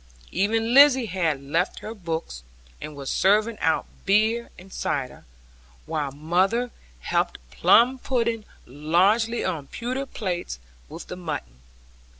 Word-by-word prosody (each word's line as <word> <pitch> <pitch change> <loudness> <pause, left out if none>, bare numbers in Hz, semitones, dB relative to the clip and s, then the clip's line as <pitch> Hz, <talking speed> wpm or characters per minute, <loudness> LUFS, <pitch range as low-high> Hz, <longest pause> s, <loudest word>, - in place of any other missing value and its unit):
Even 225 +4 +1
Lizzie 270 -2 +7
had 170 -8 -1
left 165 +6 -1
her 220 - -6
books, 165 - -5 0.4
and 150 0 -7
was 140 -1 -5
serving 215 +3 +2
out 160 - +1 0.2
beer 220 +4 +2
and 190 +1 -14
cider; 130 -3 -3 0.6
while 145 - -2
mother 185 - 0 0.3
helped - - 0
plum 235 - +4
pudding 235 -4 -1 0.2
largely 190 - +1
on 145 -4 -3
pewter 255 +3 -4
plates 180 - -4 0.3
with - - -8
the - - -7
mutton. 150 - -6
190 Hz, 125 wpm, -25 LUFS, 155-230 Hz, 0.6 s, Lizzie